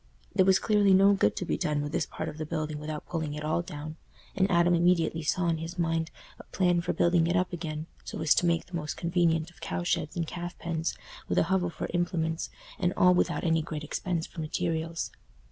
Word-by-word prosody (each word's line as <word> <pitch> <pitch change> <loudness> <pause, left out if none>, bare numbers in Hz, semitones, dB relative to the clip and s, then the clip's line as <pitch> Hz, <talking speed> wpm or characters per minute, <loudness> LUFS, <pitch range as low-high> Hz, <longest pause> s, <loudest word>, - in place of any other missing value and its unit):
There 185 - +4
was 190 0 +6
clearly 205 -3 +4
no 195 +1 +6
good 150 - +2
to - - -3
be - - -1
done 150 -1 0
with 145 - -4
this - - 0
part 155 - -5
of 155 -1 -7
the 155 - -2
building 155 -2 -3
without 150 0 -5
pulling 160 -3 -3
it 150 - -5
all 155 +2 +1
down, 155 -1 -7 0.4
and 195 0 +2
Adam 175 -1 +4
immediately 170 -1 +3
saw 170 +3 0
in 165 -1 +1
his 165 +3 -6
mind 165 -1 0 0.3
a - - -10
plan 180 -2 +2
for 175 - -1
building 170 -1 +3
it 170 - +1
up 180 +1 +1
again, 155 -2 -4 0.2
so - - -6
as 155 - +4
to 175 - +2
make 170 -1 +1
the 180 - -8
most 150 -2 -3
convenient 170 -1 +1
of 175 - -22
cow 175 - -3
sheds 155 -3 -1
and 170 -2 -1
calf 175 +2 -6
pens, 165 -1 -2 0.3
with - - -1
a - - +5
hovel 180 -2 +2
for - - -5
implements; 165 -2 -1 0.3
and 180 0 +1
all 180 0 +6
without 180 - +1
any 165 -1 +2
great 155 -1 -5
expense 170 +2 -2
for 165 - -7
materials. 165 +1 -2
165 Hz, 230 wpm, -29 LUFS, 160-175 Hz, 0.4 s, was